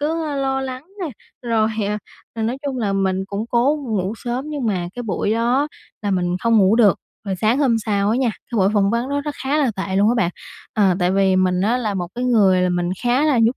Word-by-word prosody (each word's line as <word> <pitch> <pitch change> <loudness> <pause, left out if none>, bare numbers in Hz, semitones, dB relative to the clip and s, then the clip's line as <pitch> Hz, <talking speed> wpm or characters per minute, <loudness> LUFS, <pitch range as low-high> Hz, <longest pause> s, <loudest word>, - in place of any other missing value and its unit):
cứ, 320 +2 -1
ơ, 290 -2 -3
lo 270 -1 0
lắng 260 +1 -5 0.2
nè, 340 -5 -2 0.3
rồi, 225 -2 +1 0.2
ờ, 210 - -1 0.4
là 225 - -3
nói 235 +4 -1
chung 265 -2 -2
là 205 -4 0
mình 190 -1 0
cũng 200 +3 -4
cố 265 +6 +2
ngủ 200 -2 -1
sớm 245 +3 -3
nhưng 290 -5 -3
mà 180 -5 -1
cái 245 - -5
buổi 210 -1 -1
đó 245 +6 +1 0.3
là 205 - -1
mình 180 -1 0
không 230 -1 +4
ngủ 195 +2 +4
được. 210 -6 +5 0.3
Rồi 190 -2 -2
sáng 220 +8 +2
hôm 260 -6 +3
sau 200 -1 +1
á 225 - +2
nha, 255 -2 +2 0.2
cái 235 - -3
buổi 190 0 +4
phỏng 200 -1 +3
vấn 235 +3 -1
đó 285 0 -1
rất 295 0 -5
khá 280 +3 0
là 280 -5 +2
tệ 190 0 -2
luôn 205 +2 +4
á 240 - +3
bạn. 180 -7 +2 0.4
Ờ, 195 -4 +3
tại 180 -1 +2
vì 190 -1 +3
mình 185 -1 +2
á 220 +6 +2
là 220 -5 -2
một 175 -2 -3
cái 245 +1 -3
người 200 -7 +4
là 180 - +2
mình 175 0 0
khá 245 +5 +2
là 290 -5 +3
nhút 230 +3 +3
225 Hz, 255 wpm, -20 LUFS, 195-255 Hz, 0.4 s, được